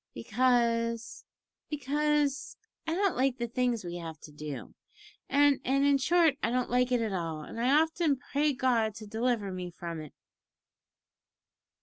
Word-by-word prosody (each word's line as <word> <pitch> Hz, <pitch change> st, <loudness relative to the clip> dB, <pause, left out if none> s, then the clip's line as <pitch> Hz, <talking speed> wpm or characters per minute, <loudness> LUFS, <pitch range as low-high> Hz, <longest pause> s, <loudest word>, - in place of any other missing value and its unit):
"Because 230 Hz, -, 0 dB, 0.4 s
because 295 Hz, 0 st, 0 dB, 0.3 s
I 325 Hz, -, 0 dB
don't 390 Hz, -1 st, +1 dB
like 260 Hz, 0 st, +1 dB
the -, -, -12 dB
kind 235 Hz, -, -4 dB
of -, -, -40 dB
things 245 Hz, -4 st, 0 dB
we 175 Hz, 0 st, -5 dB
have 165 Hz, -3 st, -7 dB
to 150 Hz, -, -11 dB
do, 150 Hz, -1 st, -7 dB, 0.6 s
and 285 Hz, 0 st, +4 dB
and 275 Hz, +2 st, +2 dB
in 280 Hz, -1 st, +4 dB
short, 320 Hz, 0 st, +3 dB
I 230 Hz, -, +1 dB
don't 250 Hz, 0 st, -1 dB
like 250 Hz, 0 st, +2 dB
it 245 Hz, -2 st, +2 dB
at 220 Hz, -3 st, -2 dB
all, 165 Hz, -4 st, -3 dB
and 230 Hz, -, -6 dB
I 280 Hz, +6 st, +5 dB
often 320 Hz, -3 st, 0 dB
pray 290 Hz, +3 st, 0 dB
God 235 Hz, -5 st, +1 dB
to 215 Hz, -, -8 dB
deliver 220 Hz, -1 st, -1 dB
me 180 Hz, -1 st, -5 dB
from 170 Hz, -2 st, -6 dB
it." 150 Hz, -, -11 dB
245 Hz, 165 wpm, -30 LUFS, 210-280 Hz, 0.6 s, I